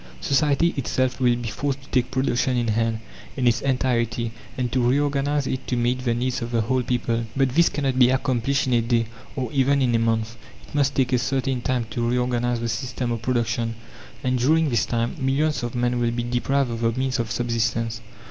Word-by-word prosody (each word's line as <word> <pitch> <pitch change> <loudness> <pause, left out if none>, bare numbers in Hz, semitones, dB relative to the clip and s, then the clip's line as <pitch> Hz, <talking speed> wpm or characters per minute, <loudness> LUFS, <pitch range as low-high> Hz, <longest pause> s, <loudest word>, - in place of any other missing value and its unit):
Society 145 - +2
itself 130 0 0
will 125 -2 +3
be 120 -1 -4
forced 135 +5 -2
to - - -17
take 125 -1 +1
production 130 -1 0
in 120 -1 0
hand, 115 +1 0 0.4
in 130 - 0
its 120 -1 +3
entirety, 120 -3 0 0.3
and 125 -2 -1
to 130 - +1
reorganize 145 +1 +1
it 130 0 -3
to 125 - 0
meet 125 +1 0
the 120 -2 +1
needs 125 +1 -1
of 115 - -3
the 115 -1 +1
whole 130 +4 +1
people. 115 -1 -1
But 135 -1 +3
this 165 +6 +4
cannot 135 -3 -1
be 125 -1 +7
accomplished 130 +1 +1
in 130 - 0
a 120 - +4
day, 115 0 +1 0.3
or 130 -5 -3
even 140 0 +3
in 125 -3 +2
a 115 - +3
month; 115 0 0 0.3
it - - -17
must 140 -1 +1
take 130 -1 +1
a 125 - +4
certain 135 0 -1
time 125 -1 0
to 120 +1 -1
reorganize 120 -1 0
the 115 - -1
system 120 +2 -3
of 115 -2 -2
production, 115 -1 -1 0.5
and 130 -1 +1
during 155 +4 +3
this 115 - +1
time 115 0 -1
millions 140 +4 +1
of 120 0 -4
men 120 0 0
will 120 -1 +1
be 120 0 -2
deprived 125 +2 0
of 115 0 -4
the 115 0 +2
means 130 0 -1
of 115 -2 -1
subsistence. 115 -1 -1
125 Hz, 215 wpm, -23 LUFS, 115-130 Hz, 0.5 s, be